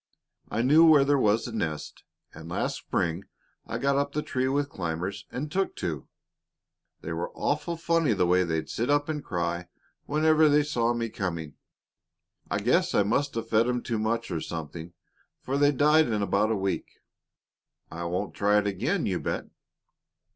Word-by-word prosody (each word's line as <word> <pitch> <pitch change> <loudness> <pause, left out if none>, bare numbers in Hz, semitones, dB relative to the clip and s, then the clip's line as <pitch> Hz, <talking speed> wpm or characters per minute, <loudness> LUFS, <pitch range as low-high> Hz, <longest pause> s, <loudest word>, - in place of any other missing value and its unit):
I 115 +3 -1
knew 150 +6 +6
where 155 -4 +7
there 140 0 +3
was 110 0 +2
a 120 - -5
nest, 80 -9 -4 0.3
and 80 +2 -10
last - - -2
spring 85 +3 -2 0.4
I - - -3
got 140 0 +1
up 140 0 -2
the 150 - -1
tree 130 0 -1
with 140 +2 0
climbers 95 - -4
and 145 +4 -4
took 195 - -1
two. - - -4 0.9
They - - -5
were 480 - -3
awful 170 -1 -1
funny 165 -5 +2
the 95 -3 +2
way 90 +1 +3
they'd 80 -2 -2
sit 120 +4 -2
up 145 +1 +2
and 150 -2 -3
cry 85 -1 -2 0.4
whenever 155 +1 +4
they 145 0 +4
saw 120 -5 0
me 115 -1 -2
coming. 85 -8 -4 1.0
I - - 0
guess - - +2
I 100 - +5
must 140 +7 0
have 115 - -4
fed 115 +2 +3
'em 125 -1 -1
too 115 -2 -2
much, 115 0 -1
or 80 -2 -2
something, 80 +1 -6 0.5
for 135 - -3
they 145 +1 +4
died 150 +3 +4
in 105 -3 0
about 105 +2 +1
a 110 - +1
week. 95 0 -2 1.0
I 85 +2 -5
won't 90 +4 -2
try 105 +1 +2
it 105 - +2
again, 100 -2 -1
you - - -1
bet!" - - -3
115 Hz, 180 wpm, -27 LUFS, 90-145 Hz, 1.0 s, where